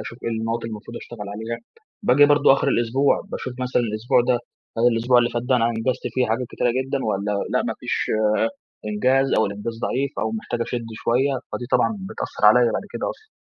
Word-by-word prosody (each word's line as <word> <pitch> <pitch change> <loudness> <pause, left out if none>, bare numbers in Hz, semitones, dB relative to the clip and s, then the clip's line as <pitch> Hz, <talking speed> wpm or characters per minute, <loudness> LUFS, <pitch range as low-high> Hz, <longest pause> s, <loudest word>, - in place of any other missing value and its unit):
أشوف 120 - -8
إيه - - -2
النقط 115 +1 -1
اللي 115 - -4
المفروض 110 +2 -8
أشتغل 105 -4 -8
عليها. 110 +2 -4 0.4
باجي 145 -6 +6
برضو 145 -1 +5
آخر 135 - +1
الأسبوع، 120 +4 +2
باشوف 130 - -4
مثلًا 125 -1 +1
الأسبوع 110 +2 +1
ده 120 0 +2 0.4
هل 120 - +4
الأسبوع 120 +2 +3
اللي 120 0 +2
فات 120 0 -2
ده 125 +1 +2
أنا 115 - +2
أنجزت 115 +2 -1
فيه 130 -1 +2
حاجات 115 +3 -1
كتيرة 120 - 0
جدًا 130 +3 -1
والّا 105 -1 -1 0.2
لأ - - +2
ما - - -2
فيش - - -1 0.8
إنجاز 130 +6 +2
أو 110 - +3
الإنجاز 105 +3 -5
ضعيف 135 +2 -1
أو 110 - 0
محتاج 115 +2 -4
أشدّ 115 -1 -3
شوية، 125 +5 +1 0.2
فدي 120 - -4
طبعًا 215 - +2
بتأثرعليَّ 480 - +3
بعد - - -2
كده - - -2
أصلًا. 435 - -12
120 Hz, 195 wpm, -23 LUFS, 115-130 Hz, 0.8 s, باجي